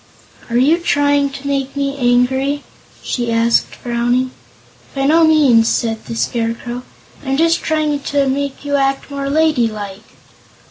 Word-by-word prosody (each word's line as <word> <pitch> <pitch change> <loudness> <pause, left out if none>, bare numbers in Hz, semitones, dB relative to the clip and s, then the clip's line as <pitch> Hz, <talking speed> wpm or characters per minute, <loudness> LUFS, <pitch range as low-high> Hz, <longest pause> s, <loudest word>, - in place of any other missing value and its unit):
"Are 235 - 0
you 295 +7 +4
trying 285 -3 +2
to 275 0 -8
make 275 -1 -2
me 280 -1 -1
angry?" 265 +3 +1 0.4
she 240 -2 -2
asked, 230 0 +1
frowning. 245 +1 -1 0.6
"By 270 0 0
no 320 +4 +4
means," 275 -8 +4
said 225 -1 -1
the 230 - -6
Scarecrow; 235 +1 -2 0.4
"I'm 270 -1 -1
just 330 +1 +2
trying 305 -2 0
to 280 0 0
make 280 +1 -3
you 285 0 +1
act 270 +1 -1
more 280 0 -3
ladylike." 230 -10 0
275 Hz, 140 wpm, -17 LUFS, 240-285 Hz, 0.6 s, you